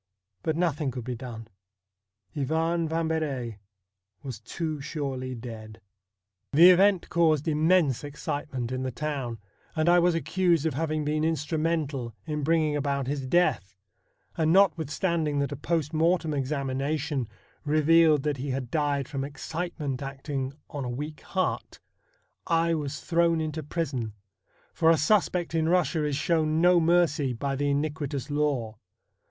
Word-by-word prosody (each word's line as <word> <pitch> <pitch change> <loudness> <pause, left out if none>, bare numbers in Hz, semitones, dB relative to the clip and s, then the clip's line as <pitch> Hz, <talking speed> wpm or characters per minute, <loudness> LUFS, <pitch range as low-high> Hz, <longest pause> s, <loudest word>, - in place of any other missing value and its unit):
But 160 - -1
no 175 -1 +2
thing 145 -1 -3
could 125 -1 -5
be 125 +2 -4
done. 115 -2 -8 0.9
Ivan 160 +4 0
Vambery 155 -9 -2 0.6
was 130 -6 -6
too 155 +5 -4
surely 135 -3 -4
dead. 110 -2 -9 0.7
The 170 +5 +9
event 190 0 +4
caused 160 -3 +2
immense 155 -3 +3
excitement 145 -4 -4
in 130 0 -2
the 130 - -2
town, 135 -3 -3 0.4
and 155 0 +1
I 175 0 +6
was 175 0 +3
accused 165 0 +1
of 160 - +1
having 155 +1 -1
been 155 +1 0
instrumental 155 -5 -1
in 150 -2 -3
bringing 155 0 +2
about 140 -2 -1
his 135 0 -3
death, 125 - +1 0.6
and, 160 -1 +2
notwithstanding 165 -3 +2
that 140 +1 0
a - - -3
post 155 +1 -1
mortem 165 0 +2
examina 140 +1 -1
tion 145 -4 -2 0.4
revealed 155 0 +4
that 150 -2 -1
he 135 +2 -4
had 130 -2 -3
died 145 -3 0
from 135 -2 -3
excitement 145 -1 -4
acting 135 0 -4 0.2
on 145 -3 -4
a 125 - -3
weak 150 +5 -5
heart, 185 -1 -2 0.7
I 165 -1 +2
was 150 -2 -3
thrown 170 -1 +2
into 155 0 -3
prison, 140 -8 -3 0.6
for 160 - +3
a 165 - +5
suspect 175 +1 +1
in 160 -1 +1
Eussia 175 -2 +2
is 145 - -1
shown 155 +1 +1
no 175 +1 +5
mercy 165 -5 +2
by 135 +3 -2
the 145 +1 0
iniquitous 145 -1 -2
law. 135 -8 -1
150 Hz, 145 wpm, -27 LUFS, 135-165 Hz, 0.9 s, The